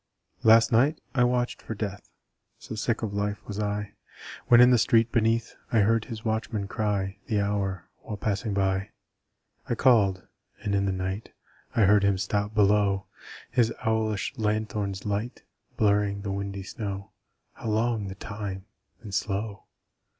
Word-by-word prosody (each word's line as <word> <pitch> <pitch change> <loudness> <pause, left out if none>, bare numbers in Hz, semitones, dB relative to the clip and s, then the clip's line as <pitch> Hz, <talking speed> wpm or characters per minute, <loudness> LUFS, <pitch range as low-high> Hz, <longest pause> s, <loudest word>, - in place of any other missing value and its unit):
Last 115 +1 +6
night 135 +7 +3
I 125 -2 +3
watched 120 0 0
for 110 - -6
Death 100 -2 -5 0.5
So - - -9
sick 110 +1 -1
of 105 -2 -2
life 100 0 -2
was 105 -1 -5
I! 105 0 -2 0.5
When 120 - +7
in 125 +1 +8
the 125 - +5
street 115 +1 +3
beneath 115 0 +1 0.2
I 115 - +4
heard 110 +2 +2
his 110 -2 -8
watchman 110 -2 -1
cry 100 -2 -2
The 105 - +1
hour, 100 -3 -1
while 105 - -6
passing 100 0 -2
by. 95 +1 0 0.8
I - - +1
called. 100 -8 +3 0.4
And 100 -2 -1
in 100 0 +2
the - - +1
night 95 +3 -4 0.4
I 115 - +3
heard 100 0 +5
him 100 -1 +3
stop 100 +2 -1
below, 100 -2 +3 0.5
His 115 -2 +3
owlish 110 -2 0
lanthorn's 105 -3 -1
light 105 +4 -3 0.3
Blurring 100 -1 +2
the 100 - -3
windy 100 0 -4
snow 100 -2 -6 0.4
How 115 - -5
long 110 -1 0
the 95 - -6
time 100 -2 -6 0.4
and 105 -4 -9
slow! 100 0 -2
105 Hz, 155 wpm, -27 LUFS, 100-110 Hz, 0.8 s, in